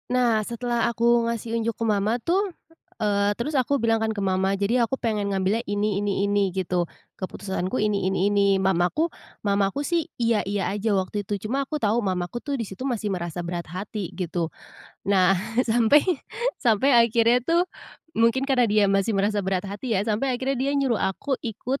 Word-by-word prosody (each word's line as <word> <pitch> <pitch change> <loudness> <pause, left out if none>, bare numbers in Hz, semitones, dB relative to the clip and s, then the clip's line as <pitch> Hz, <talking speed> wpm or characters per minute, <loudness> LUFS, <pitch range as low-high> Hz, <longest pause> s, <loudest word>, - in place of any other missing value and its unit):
Nah 245 -3 +2
setelah 235 +2 -1
aku 235 0 +2
ngasih 230 0 -2
unjuk 225 0 -1
ke 230 - -2
mama 210 +1 +1
tuh, 385 +4 +1 0.5
eee, 205 -1 +1
terus 290 +6 -3
aku 280 +1 +2
bilang 225 -3 +1
kan 220 - 0
ke 200 - -3
mama, 190 +1 +1
"Jadi 215 +5 +1
aku 235 +3 0
pengen 210 -5 -1
ngambilnya 195 +3 0
ini 205 0 0
ini 200 -1 0
ini," 200 -1 +2
gitu, 180 -2 0 0.3
"Keputusanku 190 +2 -3
ini 205 -3 +1
ini 195 +1 +1
ini," 200 -1 +3
mamaku 190 - +1 0.3
mamaku 200 +7 +1
sih, 335 -1 0
"iya 230 -3 +2
iya" 200 -2 -1
aja 210 0 0
waktu 190 +2 -2
itu, 205 - -1
cuma 270 +5 -1
aku 305 - -2
tahu 225 -3 +1
mamaku 185 +3 -2
tuh 285 - -4
di 230 - -3
situ 195 +5 -8
masih 215 -4 -2
merasa 175 -1 -4
berat 170 0 -4
hati 195 +2 -5
gitu. 175 -2 -2 0.6
Nah 195 -1 +4 0.3
sampai 235 +5 +5 0.6
sampai 235 +3 +4
akhirnya 235 +1 +4
tuh 335 +3 +3 0.6
mungkin 230 +4 +2
karena 255 -3 +4
dia 210 0 +4
masih 195 +3 +2
merasa 205 +1 +1
berat 190 0 -1
hati 210 +5 -4
ya, - - +2
sampai 230 +5 0
akhirnya 265 +1 -1
dia 270 +3 0
nyuruh 260 -5 +1
aku 260 +8 -1
ikut, 245 +4 -3
215 Hz, 180 wpm, -24 LUFS, 195-240 Hz, 0.6 s, sampai